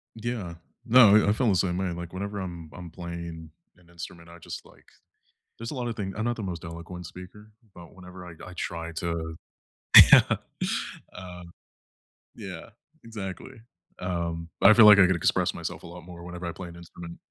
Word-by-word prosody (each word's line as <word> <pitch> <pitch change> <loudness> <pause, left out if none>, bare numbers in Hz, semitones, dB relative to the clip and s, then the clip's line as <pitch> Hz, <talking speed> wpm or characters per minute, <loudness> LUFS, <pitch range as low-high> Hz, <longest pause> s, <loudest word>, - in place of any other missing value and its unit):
Yeah, 110 -7 -4 0.3
no, 115 -4 +7
yeah, 105 - +5
I - - +4
feel 120 +3 0
the 95 - +3
same 90 -1 0
way, 95 -2 -1
like, 85 0 -7
whenever 100 +2 -4
I'm 85 -4 -7
I'm 90 -1 -9
playing 85 -2 -8 0.3
an 85 -1 -24
instrument, 85 0 -10
I 85 0 -13
just, - - -8
like - - -20 0.7
there's 115 0 -6
a - - -6
lotta 120 -2 -3
thing 100 -3 -5
I'm 110 - -2
not 120 0 -1
the 110 - -6
most 90 -2 -5
eloquent 85 +1 -8
speaker, 105 +5 -12 0.2
but 85 -2 -13
whenever 90 0 -12
I 85 - -9
I 90 - -10
try 85 -1 -5
to 80 0 -4 0.8
yeah. - - +7 0.8
Uh, 90 -1 -10 0.9
yeah, - - -8 0.3
exactly, 105 -1 -8 0.4
um, 85 -2 -3
I 110 - +8
feel, 115 -2 +8
like, 105 -1 +9
I 95 - +8
could 95 - +2
express 85 - +1
myself - - -6
a - - -9
lot 90 0 -11
more 85 -1 -11
whenever 90 0 -7
I 85 - -3
play 90 +1 -8
an 85 - -12
instrument. 85 0 -11
90 Hz, 185 wpm, -26 LUFS, 85-100 Hz, 0.9 s, like